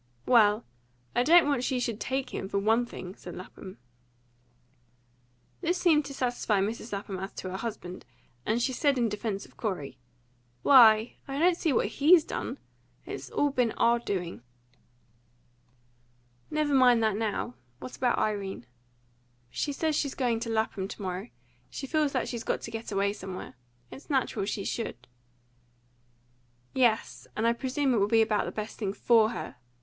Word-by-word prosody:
"Well, 220 -2 +4 0.5
I - - +4
don't 335 +5 +6
want 280 -4 +1
she 255 -1 0
should 230 -3 -2
take 265 +1 -2
him, 195 - -4
for 200 - -1
ONE 225 +4 +2
thing," 185 -5 -8
said 175 - -9
Lapham. 185 +1 -10 1.8
This 350 +1 +1
seemed 315 -5 +3
to 275 - -7
satisfy 245 -5 0
Mrs. 220 +4 -3
Lapham 200 -1 -4
as 195 +2 -5
to 185 - -6
her 190 - -3
husband, 195 -5 -6 0.4
and 220 - 0
she 260 +2 0
said 280 +1 +2
in 235 -2 +2
defence 210 -1 -3
of - - -21
Corey, 185 - -4 0.6
"Why, 225 -4 +7
I 275 0 -4
don't 345 +3 +4
see 330 -2 0
what 255 - +2
HE'S 300 - +5
done. - - -4 0.5
It's - - -7
all 290 -1 +1
been 245 -4 +1
our 235 +1 +3
doing." 180 - -4 2.1
"Never 305 -1 0
mind 250 -3 +5
that 215 -2 +2
now. 210 - -2 0.2
What 255 - -8
about 245 -2 +1
Irene?" 200 - -2 0.9
"She 290 - -2
says 310 +2 0
she's 280 -2 -1
going 240 -4 0
to 230 0 -4
Lapham 220 -3 -1
to - - -9
morrow. 185 +4 -4 0.4
She 270 - -6
feels 300 +1 +1
that 255 - 0
she's 235 -2 -4
got - - -1
to 230 - -7
get 225 0 -6
away 200 0 +1
somewhere. 190 -2 -7 0.4
It's 275 - -12
natural 265 -8 0
she 200 -1 -3
should." 125 - -4 1.7
"Yes, 240 -4 +1
and 220 - 0
I 230 - +4
presume 260 +2 0
it - - +2
will 200 -1 +3
be 225 +1 +5
about 215 -1 0
the - - -4
best 215 0 -6
thing 200 -3 -2
FOR 225 0 +4
her. 180 - -6
230 Hz, 165 wpm, -28 LUFS, 205-265 Hz, 2.1 s, Why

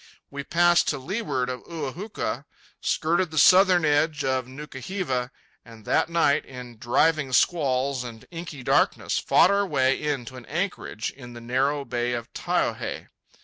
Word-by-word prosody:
We 140 0 -5
passed 175 +2 +3
to - - 0
leeward 140 - -2
of 125 0 -4
Ua 150 -6 -4
huka, 205 +6 -4 0.4
skirted 170 +2 +1
the 155 - -7
southern 180 +2 +6
edge 150 +1 +2
of 130 -1 0
Nuka 135 +1 -9
hiva, 130 -9 -2 0.3
and 115 -3 -15
that - - +1
night, 165 -4 +2
in 125 -3 -10
driving 140 +4 +2
squalls 135 -5 +2
and 115 -2 -9
inky 165 -5 -7
darkness, - - +2
fought - - +4
our 200 0 +2
way 135 -4 +2
in 145 -5 -2
to 130 - -9
an 125 - -12
anchorage 170 - -3
in 120 -3 -12
the 120 - -9
narrow 135 +4 0
bay 120 0 -1
of 120 -1 -5
Taiohae. - - -2
140 Hz, 160 wpm, -25 LUFS, 125-165 Hz, 0.4 s, southern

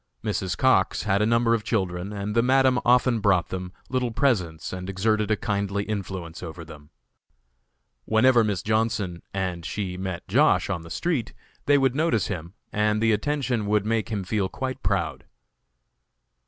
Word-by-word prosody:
Mrs. 90 -3 -2
Cox 130 -8 +3
had 100 -1 +1
a 105 - +3
number 115 0 +3
of 115 -2 0
children 95 -3 -2
and 105 0 -4
the 115 - +5
Madam 130 0 +3
often 125 -1 +3
bought 100 -4 +2
them 90 -1 -5 0.2
little 125 -1 -1
presents 95 - 0
and 90 +1 -5
exerted 105 +2 0
a 110 - +2
kindly 100 -1 -1
influence 95 -5 -5
over 85 -1 -7
them. 75 -2 -13 1.2
Whenever 120 +2 +4
Miss 100 -4 -1
Johnson 110 -5 0
and 95 -3 -3
she 90 +2 -4
met 95 -2 -5
Josh. - - +3
on 90 -4 -2
the 85 - -11
street 135 - -2 0.3
they 145 0 +6
would 135 -2 +2
notice 150 -6 +1
him, 85 -1 -6 0.2
and 105 0 +1
the 110 0 +3
attention 120 -1 0
would 105 0 +2
make 115 0 0
him 105 -3 -2
feel 95 0 -1
quite 130 -1 -4
proud. - - -1
105 Hz, 165 wpm, -25 LUFS, 95-115 Hz, 1.2 s, they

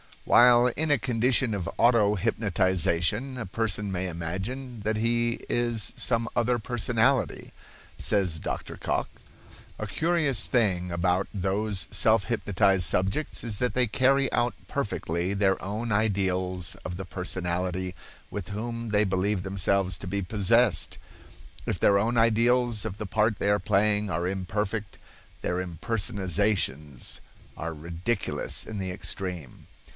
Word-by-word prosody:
While 120 0 +6
in 150 +6 -1
a 145 - +5
condition 125 0 +1
of 95 -4 -3
auto 115 -3 +4
hypnotization 95 - +1
a 120 - -4
person 105 0 -1
may 95 0 -2
imagine 95 +10 -5
that 110 +2 -1
he 115 +1 +1
is 120 -3 0
some 115 -1 +1
other 120 +1 +2
personality. 120 +3 0 0.5
Says 90 -6 +1
Dr. - - -5
Cocke: - - -1 0.7
"A - - -4
curious 160 -6 +1
thing 95 -7 +1
about 90 +2 +1
those 100 +1 -1
self 110 -3 +4
hypnotized 100 -3 +2
subjects 95 - 0
is 110 -4 -4
that 125 - 0
they 125 -1 +2
carry 135 +4 +2
out 120 0 +1
perfectly 95 - -2
their 95 -1 +2
own 110 +5 -3
ideals 95 -4 0
of 90 -1 -4
the 95 - -5
personality 90 0 -2 0.4
with 100 -4 -5
whom 115 +2 -4
they 105 0 +3
believe 95 0 0
themselves 95 -1 +1
to 100 - -7
be 100 +2 -1
possessed. 105 0 +2 0.7
If - - -1
their 100 0 +4
own 115 +4 0
ideals 115 0 +3
of 100 -2 -4
the 105 - -5
part 110 +1 +1
they 100 - 0
are 105 0 +3
playing 105 +1 +2
are 85 0 -1
imperfect, 95 +2 -3 0.4
their 90 - -1
impersonations 90 - -1 0.4
are 85 0 -4
ridiculous 85 +8 -2
in 110 - -6
the 95 -1 -3
extreme. 90 -6 -5
105 Hz, 135 wpm, -27 LUFS, 95-115 Hz, 0.7 s, While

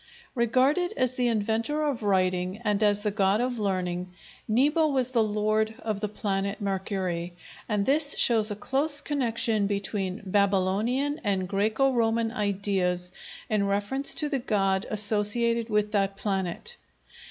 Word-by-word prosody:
Regarded 260 +9 +1
as 255 -2 +1
the 250 -1 0
inventor 230 +7 -1
of 285 -6 -2
writing 185 -2 0
and 210 0 +1
as 205 -1 +2
the 210 - 0
god 200 0 +1
of 245 -1 -2
learning, 180 -3 -2 0.4
Nebo 295 +8 +2
was 260 -4 0
the 245 -3 +1
lord 215 +1 0
of 215 -3 -4
the 210 0 -3
planet 200 -1 -3
Mercury, 190 -3 -3 0.3
and 210 -2 0
this 290 +1 +4
shows 225 -2 +4
a 205 - -2
close 285 +7 +2
connection 230 -7 0
between 200 -1 -3
Babylonian 200 +9 0
and 195 -3 -1
Græco 220 +8 +1
Roman 230 -1 +1
ideas 195 -4 -1 0.4
in 205 -2 0
reference 205 +8 +1
to 300 - +1
the 275 -2 -1
god 195 -5 0
associated 220 +2 +2
with 210 -1 0
that 195 -1 0
planet. 195 - -3
210 Hz, 140 wpm, -26 LUFS, 195-240 Hz, 0.4 s, this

